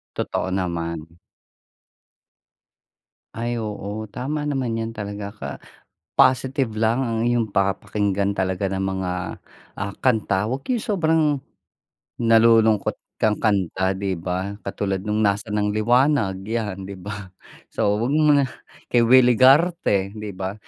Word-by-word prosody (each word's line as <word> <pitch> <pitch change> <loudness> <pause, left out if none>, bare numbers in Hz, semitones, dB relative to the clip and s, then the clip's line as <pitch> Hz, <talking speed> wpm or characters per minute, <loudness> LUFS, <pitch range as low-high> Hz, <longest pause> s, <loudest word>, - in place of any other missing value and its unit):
Totoo - - -2
naman. 85 -3 -3 2.2
Ay 120 +1 -2
oo. 105 -1 -4
Tama 145 +4 -3
naman 130 -6 -1
'yan 115 0 -3
talaga 100 -1 -6
ka. 105 - -7 0.7
Positive 130 +1 +3
lang 110 +3 +1
ang 115 -4 -1
iyong 120 -2 +1
papakinggan 100 0 0
talaga 95 +1 -1
ng 95 0 -2
mga, 95 -1 -2 0.7
ah, 100 0 -3
kanta. 110 -4 +1
Wag 135 +1 -4
yung 245 -4 0
sobrang, 165 -5 +2 1.0
nalulungkot 115 -2 +4 0.2
kang 105 -1 +2
kanta 95 -2 +1
'di 95 -1 -2
ba 95 +3 -3
katulad 95 -1 -3
nung 105 +1 0
nasa 100 +2 0
ng 105 0 0
liwanag 115 -3 +2
'yan, 105 -4 -3
'di 100 - -7
ba 100 -2 -7 0.3
so 105 0 0
wag 120 +6 0
mo 155 -1 +4
muna 140 -2 +5 0.5
kay 120 - +5
Willy 125 +1 +6
Garte 130 - +4
'di 105 -1 -6
ba. 95 0 -3
105 Hz, 130 wpm, -22 LUFS, 95-120 Hz, 2.2 s, Willy